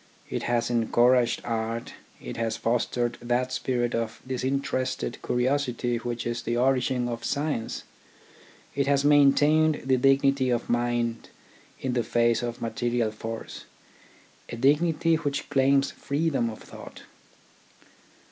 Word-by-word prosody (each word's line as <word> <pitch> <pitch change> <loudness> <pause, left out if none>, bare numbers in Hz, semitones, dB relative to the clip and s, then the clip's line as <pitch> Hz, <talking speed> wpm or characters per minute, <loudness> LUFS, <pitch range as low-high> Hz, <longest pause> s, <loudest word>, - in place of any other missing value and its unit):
It - - -2
has 120 0 +1
encouraged 120 +1 +3
art, 115 0 -3 0.3
it - - -7
has 115 -1 -2
fostered 120 +1 -1
that 125 +2 -1
spirit 120 -2 -1
of 115 -1 -2
disinterested 130 -1 -2
curiosity 125 -1 0
which 120 0 -4
is 120 0 -2
the 120 +1 -2
origin 130 -1 +1
of 120 -1 -5
science, 145 -5 -2 0.9
it 140 0 0
has 140 0 +2
maintained 145 +2 +4
the 130 -1 +3
dignity 135 0 +3
of 120 -1 -1
mind 120 -1 -1 0.5
in 130 -2 -2
the 120 - +1
face 115 0 +2
of 120 -1 -4
material 120 -1 -1
force, 115 +1 -7 0.8
a - - -5
dignity 160 +5 +2
which 145 -2 -3
claims 135 0 +3
freedom 140 -5 -1
of 110 - -9
thought. - - -12
125 Hz, 125 wpm, -26 LUFS, 120-140 Hz, 0.9 s, maintained